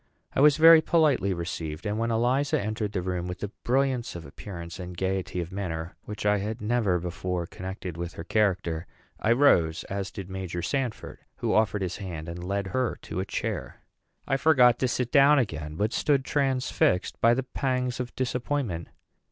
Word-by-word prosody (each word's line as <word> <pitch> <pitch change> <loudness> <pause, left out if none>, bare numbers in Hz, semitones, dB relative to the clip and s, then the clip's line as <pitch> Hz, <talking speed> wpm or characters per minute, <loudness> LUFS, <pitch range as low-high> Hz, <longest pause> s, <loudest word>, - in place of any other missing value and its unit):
I - - +1
was 150 0 +6
very 165 0 +9
politely 155 - +3
received; 85 -2 -4
and 105 +1 -1
when 115 0 0
Eliza 130 +6 +1
entered 110 -1 -2
the 90 - -1
room 90 -1 -2
with 90 +2 -6
a 105 - -2
brilliance 130 -3 0
of 85 - -7
appearance 85 +3 -8
and 90 -1 -7
gayety 95 -1 -1
of 85 +1 -6
manner 85 -4 -4
which 105 -1 -6
I 105 0 +3
had 110 +3 -4
never 105 -4 +1
before 90 0 -3
connected 90 -1 -7
with 85 0 -5
her 85 - -7
character, 90 -4 0 0.3
I 110 - +1
rose, 90 - +4
as 100 -1 -2
did 100 -4 -7
Major 95 -2 -5
Sanford, 135 -5 -3 0.2
who - - -1
offered 105 -2 +2
his 90 -1 -3
hand 85 -5 -6
and 85 +1 -6
led 100 +2 -1
her 120 +6 -1
to - - -4
a 95 - -1
chair. - - -4 0.5
I 135 - +2
forgot 125 -6 +5
to 130 - +2
sit 125 0 -1
down 145 +1 +6
again, 80 - -2
but 105 +6 0
stood 140 -3 +2
transfixed 130 -10 +1
by 115 +1 +5
the 135 - -1
pangs 125 -1 -2
of 125 -1 -5
disappointment. 125 - -2
105 Hz, 185 wpm, -27 LUFS, 90-125 Hz, 0.5 s, very